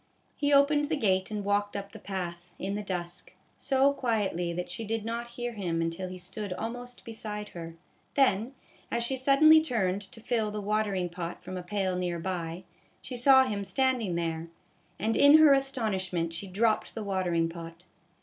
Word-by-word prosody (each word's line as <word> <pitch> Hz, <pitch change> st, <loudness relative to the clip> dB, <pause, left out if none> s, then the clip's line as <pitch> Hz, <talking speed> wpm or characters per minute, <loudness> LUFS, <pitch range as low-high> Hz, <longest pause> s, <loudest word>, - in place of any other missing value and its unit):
He 285 Hz, 0 st, 0 dB
opened 290 Hz, +1 st, +5 dB
the 310 Hz, +2 st, -1 dB
gate 190 Hz, -7 st, +1 dB
and 210 Hz, -2 st, -4 dB
walked 205 Hz, 0 st, 0 dB
up 200 Hz, 0 st, -6 dB
the -, -, -10 dB
path, 175 Hz, -2 st, -6 dB
in 195 Hz, +1 st, -3 dB
the 205 Hz, -, -2 dB
dusk, 180 Hz, -2 st, -5 dB, 0.2 s
so 275 Hz, +1 st, +2 dB
quietly 210 Hz, -10 st, -1 dB
that 175 Hz, +1 st, -4 dB
she 200 Hz, +6 st, -4 dB
did 220 Hz, 0 st, -3 dB
not 235 Hz, +1 st, -3 dB
hear 240 Hz, 0 st, -2 dB
him 175 Hz, -6 st, -2 dB
until 165 Hz, +3 st, -2 dB
he 185 Hz, -, -7 dB
stood 190 Hz, +2 st, -5 dB
almost 245 Hz, +4 st, -6 dB
beside 210 Hz, -2 st, -6 dB
her; 165 Hz, -1 st, -8 dB, 0.4 s
then, 255 Hz, -3 st, +3 dB, 0.4 s
as 235 Hz, 0 st, 0 dB
she 265 Hz, +3 st, 0 dB
suddenly 285 Hz, +4 st, +6 dB
turned 200 Hz, -10 st, 0 dB
to 200 Hz, +3 st, -10 dB
fill 225 Hz, -1 st, 0 dB
the 210 Hz, 0 st, -4 dB
water 210 Hz, 0 st, 0 dB
ing 180 Hz, -1 st, -1 dB
pot 170 Hz, 0 st, -6 dB
from 185 Hz, -, -7 dB
a 180 Hz, -, -4 dB
pail 190 Hz, 0 st, -1 dB
near 180 Hz, -1 st, -2 dB
by, 170 Hz, 0 st, -4 dB, 0.4 s
she 255 Hz, -, -6 dB
saw 265 Hz, +2 st, +6 dB
him 205 Hz, -5 st, -2 dB
standing 230 Hz, -1 st, +1 dB
there, 165 Hz, -1 st, -2 dB, 0.5 s
and, 220 Hz, +4 st, 0 dB
in 285 Hz, +2 st, +8 dB
her 310 Hz, -2 st, +7 dB
astonishment, 195 Hz, -11 st, 0 dB
she 180 Hz, +4 st, -5 dB
dropped 215 Hz, +3 st, 0 dB
the 220 Hz, -, -4 dB
watering 180 Hz, -4 st, 0 dB
pot. 165 Hz, +1 st, -9 dB
205 Hz, 185 wpm, -29 LUFS, 180-240 Hz, 0.5 s, in